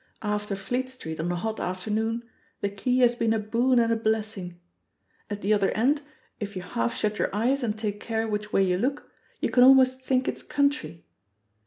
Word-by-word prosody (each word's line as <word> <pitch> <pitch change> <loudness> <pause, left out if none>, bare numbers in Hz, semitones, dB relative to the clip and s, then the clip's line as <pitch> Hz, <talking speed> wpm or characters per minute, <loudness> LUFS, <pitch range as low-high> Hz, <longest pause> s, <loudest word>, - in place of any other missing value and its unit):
After 210 -1 -1
Fleet 245 +7 -2
Street 160 -12 -7
on 170 +2 -1
a - - -1
hot 220 +5 -3
afternoon 220 +5 -2 0.4
the 200 - 0
key 250 +6 0
has 240 -1 +5
been 230 -2 +1
a - - +1
boon 235 +4 +1
and 230 -1 +4
a - - +2
blessing. 215 -5 -2 0.7
At 205 0 -5
the 205 +2 +3
other 200 -2 +2
end, 275 +7 +2 0.4
if 205 -2 -5
you 185 - -4
half 115 -10 -2
shut 210 0 -1
your - - +1
eyes 255 +6 +1
and 220 -3 -1
take 210 -2 -3
care 225 0 -2
which 210 0 -3
way 195 - +3
you 180 -1 +1
look, 275 +6 -2 0.3
you - - 0
can 245 - +4
almost 260 0 +6
think 255 0 +1
it's - - -2
country. 280 - -1
220 Hz, 200 wpm, -26 LUFS, 200-245 Hz, 0.7 s, almost